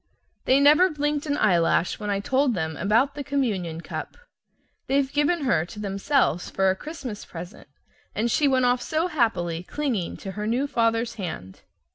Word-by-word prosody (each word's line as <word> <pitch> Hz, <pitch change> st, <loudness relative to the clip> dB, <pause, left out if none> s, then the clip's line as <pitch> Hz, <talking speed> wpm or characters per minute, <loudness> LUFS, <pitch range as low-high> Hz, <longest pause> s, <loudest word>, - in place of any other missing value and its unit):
They 265 Hz, +2 st, +4 dB
never 305 Hz, +6 st, +6 dB
blinked 295 Hz, -1 st, -2 dB
an 290 Hz, 0 st, 0 dB
eyelash 175 Hz, -, +2 dB
when 210 Hz, -1 st, -4 dB
I 200 Hz, -1 st, 0 dB
told 260 Hz, +2 st, +1 dB
them 160 Hz, -2 st, -2 dB
about 220 Hz, +9 st, +2 dB
the 290 Hz, -, -5 dB
communion 205 Hz, -, -2 dB
cup. -, -, -7 dB, 0.7 s
They've 275 Hz, 0 st, +1 dB
given 295 Hz, +3 st, +2 dB
her 240 Hz, -, +2 dB
to 210 Hz, -, -10 dB
themselves 200 Hz, -, 0 dB
for 190 Hz, 0 st, +2 dB
a -, -, -2 dB
Christmas 260 Hz, -4 st, -7 dB
present, 175 Hz, +2 st, -10 dB, 0.5 s
and 230 Hz, +2 st, 0 dB
she 295 Hz, -, +3 dB
went 260 Hz, -2 st, +3 dB
off 245 Hz, 0 st, +2 dB
so 315 Hz, +7 st, -1 dB
happily, 195 Hz, -, 0 dB
clinging 230 Hz, -, -3 dB
to 195 Hz, -, -7 dB
her 210 Hz, +2 st, -4 dB
new 245 Hz, +5 st, +1 dB
father's 230 Hz, -3 st, 0 dB
hand! 95 Hz, -, -6 dB
235 Hz, 170 wpm, -25 LUFS, 190-285 Hz, 0.7 s, never